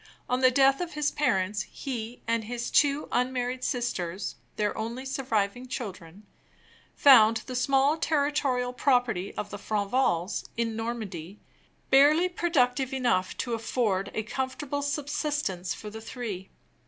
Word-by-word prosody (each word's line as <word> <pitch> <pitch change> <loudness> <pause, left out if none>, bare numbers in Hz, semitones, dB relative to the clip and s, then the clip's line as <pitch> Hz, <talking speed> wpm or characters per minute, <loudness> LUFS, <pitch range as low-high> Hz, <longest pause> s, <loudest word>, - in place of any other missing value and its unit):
On 250 +1 0
the 255 - +7
death 270 +3 +4
of 350 -1 -4
his 300 -1 0
parents, 205 -7 +1
he 240 -3 -5
and 230 -1 +1
his 240 +1 -4
two 285 0 +3
unmarried 250 0 -1
sisters 190 -7 -2 0.2
(their 210 -1 0
only 235 +4 -4
surviving 245 -3 -1
children) 200 -6 -7 0.7
found 225 -5 +7
the 255 - -6
small 275 +4 +3
territorial 285 -5 0
property 245 -7 +1
of 205 - -5
the 205 - -6
Franvals, 200 -3 0
in 230 -1 -1
Normandy, 210 -6 -5 0.5
barely 295 +6 +6
productive 270 -7 +1
enough 240 -8 0
to 240 - -2
afford 220 -4 0
a 220 - -1
comfortable 265 +5 -3
subsistence 285 - -2
for 210 - -8
the 220 +1 -8
three. 220 -6 -6
245 Hz, 130 wpm, -28 LUFS, 210-270 Hz, 0.7 s, the